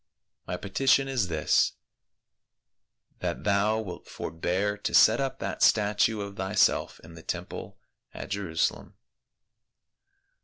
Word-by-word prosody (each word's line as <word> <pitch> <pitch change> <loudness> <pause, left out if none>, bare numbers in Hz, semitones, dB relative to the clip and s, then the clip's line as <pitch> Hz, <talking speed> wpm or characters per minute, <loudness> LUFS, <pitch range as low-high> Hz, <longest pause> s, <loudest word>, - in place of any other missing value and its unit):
My 90 - -3
petition 135 +8 +2
is 125 -8 0
this, 80 -4 +2 1.5
that - - -3
thou 105 +2 +2
wilt 95 -6 -7
forbear 95 +5 -2
to - - -2
set 110 +2 +6
up 135 -1 -2
that - - -5
statue 105 +1 +3
of 100 0 -7
thyself 95 +1 +1
in 80 +1 -13
the 80 - -11
temple - - -6 0.3
at - - -8
Jerusalem." 95 -6 -2
100 Hz, 115 wpm, -27 LUFS, 90-110 Hz, 1.5 s, set